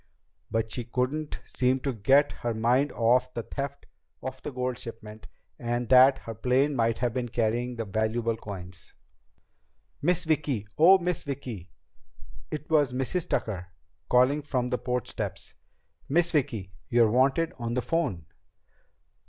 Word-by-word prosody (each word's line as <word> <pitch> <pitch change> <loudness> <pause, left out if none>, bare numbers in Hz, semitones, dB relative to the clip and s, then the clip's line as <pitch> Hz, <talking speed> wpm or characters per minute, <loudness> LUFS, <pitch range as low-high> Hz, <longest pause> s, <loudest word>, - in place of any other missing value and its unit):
But 115 0 -1
she 120 - -2
couldn't 130 +6 -2
seem 130 0 +1
to 135 -1 -1
get 135 +7 +4
her 120 -1 -2
mind 125 +6 +2
off 125 +2 +2
the 115 - -2
theft 140 +4 -5 0.4
of 130 0 -6
the - - -4
gold 125 -1 -2
shipment 110 -2 -9 0.3
and 120 0 -2
that 130 +1 +7
her 115 - -5
plane 130 +6 +1
might 115 -2 +1
have 120 -1 0
been 120 -1 -2
carrying 120 +2 0
the 115 -1 -3
valuable 110 +3 0
coins. 90 -5 -7 1.1
"Miss 180 +3 +2
Vicki! 145 - 0
Oh, 180 +5 +7
Miss 180 -2 -1
Vicki!" 125 - -6 0.8
It 150 0 -5
was 145 -5 +3
Mrs. 135 +7 -1
Tucker, 90 -5 -2 0.4
calling 130 +4 +4
from 130 -4 -1
the 125 - -1
porch 125 0 -2
steps. - - -4 0.6
"Miss 170 +4 +3
Vicki, 110 - -1 0.2
you're 115 -2 +4
wanted 135 +7 +2
on 120 0 -2
the 125 - +1
phone." 130 - -1
125 Hz, 145 wpm, -27 LUFS, 115-140 Hz, 1.1 s, that